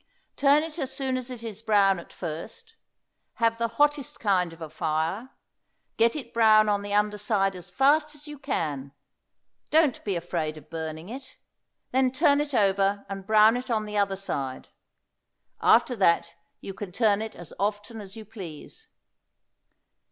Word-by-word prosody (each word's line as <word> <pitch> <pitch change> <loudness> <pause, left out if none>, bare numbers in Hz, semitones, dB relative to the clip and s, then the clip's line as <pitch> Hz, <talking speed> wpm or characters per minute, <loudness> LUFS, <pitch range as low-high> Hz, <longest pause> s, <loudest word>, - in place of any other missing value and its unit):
Turn 285 +2 +4
it 325 +1 -7
as 265 -3 -2
soon 265 -1 -2
as 255 0 -3
it 245 -2 -8
is 220 -2 -6
brown 200 -4 +3
at - - -13
first; 180 - -7 0.6
have 230 -1 +1
the 230 - +1
hottest 295 -2 +1
kind 185 -5 +1
of 165 - -14
a 160 - -6
fire; 160 - -2 0.7
get 230 +3 +3
it 260 -6 -7
brown 215 -2 +5
on 205 -1 +1
the 205 0 -6
under 210 0 +1
side 195 -2 +1
as 180 0 -9
fast 295 - +2
as 295 +1 -8
you 295 -2 -9
can; 145 - -3 0.8
don't 305 -4 +3
be 200 -3 -1
afraid 165 -3 -3
of 155 +1 -15
burning 160 0 -5
it; 265 +3 -9 0.5
then 260 0 +2
turn 285 +1 +3
it 290 -2 -3
over 200 -1 +2
and 195 -1 -6
brown 215 +1 +6
it 250 +1 -4
on 220 -2 0
the 210 0 -7
other 200 -1 +1
side; 135 -9 -4 0.9
after 250 - +4
that 170 -4 +2 0.3
you 195 - -6
can 200 -1 -7
turn 210 +1 +2
it 220 0 -6
as 175 -2 -10
often 205 +2 -2
as 195 -1 -10
you 220 -1 -9
please. 190 -8 -10
210 Hz, 170 wpm, -26 LUFS, 185-255 Hz, 0.9 s, brown